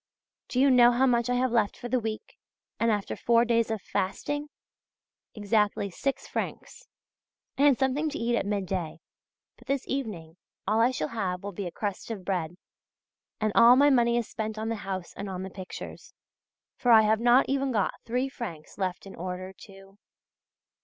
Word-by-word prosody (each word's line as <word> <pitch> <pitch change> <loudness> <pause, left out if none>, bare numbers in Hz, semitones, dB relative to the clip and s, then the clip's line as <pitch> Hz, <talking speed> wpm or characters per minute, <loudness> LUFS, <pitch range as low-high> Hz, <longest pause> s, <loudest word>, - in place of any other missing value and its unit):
Do 250 - -2
you 275 +1 +5
know 245 -1 +7
how 250 +2 +3
much 240 -2 +2
I 250 - +2
have 255 0 +1
left 220 -4 +1
for 245 - -6
the 255 +1 +1
week, 220 -1 -6 0.4
and 230 - +2
after 205 -2 -1
four 235 0 +3
days 230 -1 +2
of 220 -3 -3
fasting? 290 +10 -2 0.9
Exactly 210 -1 0
six 275 +9 -3
francs. - - -5 0.7
I 285 - +5
had 280 -4 +5
something 275 +4 0
to 300 - -5
eat 235 -2 0
at 205 - -1
midday; 185 -5 -2 0.6
but 240 - -19
this 275 -1 -1
evening 190 -12 -4 0.3
all 215 +2 +2
I 235 - +5
shall 255 - -3
have 190 -5 -3
will 200 - -4
be 195 0 -5
a - - -6
crust 205 +2 -4
of 200 -5 -6
bread. 175 -3 -2 0.8
And 215 -1 +1
all 235 +2 +8
my 285 +2 +5
money 235 -2 +3
is 235 -3 -1
spent 220 -1 -4
on 220 +1 -3
the 230 - -1
house 190 -3 -5
and 200 - -5
on 185 -1 -5
the 190 - -7
pictures. 185 -1 -9 0.6
For 245 - +2
I 220 -1 +8
have 215 0 +3
not 240 +3 +5
even 275 0 0
got 205 -5 +1
three 250 +3 -1
francs 205 - -8
left 185 -1 -2
in 195 - -10
order 185 +2 -6
to.... 195 0 -16
220 Hz, 185 wpm, -27 LUFS, 195-245 Hz, 0.9 s, all